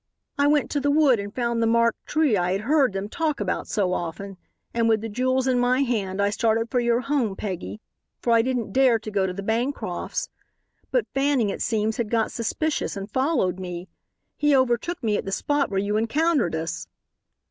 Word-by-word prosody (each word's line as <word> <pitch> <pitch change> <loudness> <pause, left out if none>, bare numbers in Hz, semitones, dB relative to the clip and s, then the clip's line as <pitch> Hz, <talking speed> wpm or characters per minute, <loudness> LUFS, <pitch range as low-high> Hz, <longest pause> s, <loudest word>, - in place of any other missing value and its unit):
"I 285 0 +2
went 295 -1 +2
to 290 - +1
the 285 +1 0
wood 285 -5 +4
and 200 0 -5
found 235 -2 0
the 230 - +3
marked 230 0 +1
tree 305 -7 +2
I 180 -1 +1
had 195 - -1
heard 275 -1 +2
them 195 +1 -3
talk 310 +5 -1
about 195 -3 -2
so 190 -3 0
often 185 +3 -5 0.4
and 230 -1 +2
with 220 -1 +3
the 225 - -4
jewels 255 +4 0
in 255 -2 +2
my 250 +2 +2
hand 205 -7 -1
I 200 0 +2
started 225 +1 0
for 250 - +2
your 240 0 +2
home, 260 -7 0
Peggy, 195 +2 -5 0.4
for 235 - +1
I 230 - +6
didn't 245 -2 -2
dare 260 -3 +4
to 215 -1 -8
go 195 -2 +1
to 180 - -3
the 200 +2 -6
Bancrofts'. 235 +7 -2 0.6
But - - +1
Fanning, 270 -5 +2
it - - -6
seems, 220 -1 0
had 230 -3 -2
got 225 -1 +1
suspicious, 260 +2 -2
and 200 +1 -6
followed 260 - +1
me. 180 0 -6 0.5
He 295 -1 +3
overtook 260 +6 +1
me 210 -2 +1
at - - -4
the 195 - -4
spot 290 +8 0
where 195 - -2
you 205 +2 0
encountered 265 - +1
us." 160 0 -4
230 Hz, 205 wpm, -24 LUFS, 200-265 Hz, 0.6 s, I